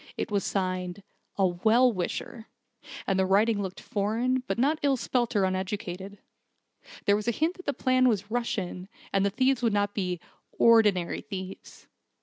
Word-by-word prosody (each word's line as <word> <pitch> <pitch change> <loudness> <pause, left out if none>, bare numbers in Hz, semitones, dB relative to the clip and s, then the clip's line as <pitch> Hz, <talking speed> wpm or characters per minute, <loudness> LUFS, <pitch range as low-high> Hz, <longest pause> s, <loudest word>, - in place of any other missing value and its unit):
It - - -3
was 200 -1 +1
signed 185 0 -2 0.3
'A 195 - +3
Well 220 +8 +3
Wisher', 220 +4 -4 0.6
and 190 -1 +1
the 190 - +3
writing 205 +2 +3
looked 190 -1 -5
foreign, 225 +5 0
but - - -1
not 290 +6 +2
ill 275 -2 +2
spelt 240 -1 -1
or 200 - +3
uneducated. 190 +1 -4 0.9
There 200 - +4
was 210 +1 -3
a - - +4
hint 320 - 0
that 365 - -12
the - - +3
plan 255 -1 +3
was 205 -2 -2
Russian, 195 -6 -3 0.2
and 195 0 +3
the 200 - +3
thieves 260 +4 +1
would 230 -3 +2
not 205 0 +1
be 180 -3 -2 0.4
'ordinary 210 -7 +4
thieves.' 195 -3 -8
205 Hz, 165 wpm, -27 LUFS, 190-235 Hz, 0.9 s, There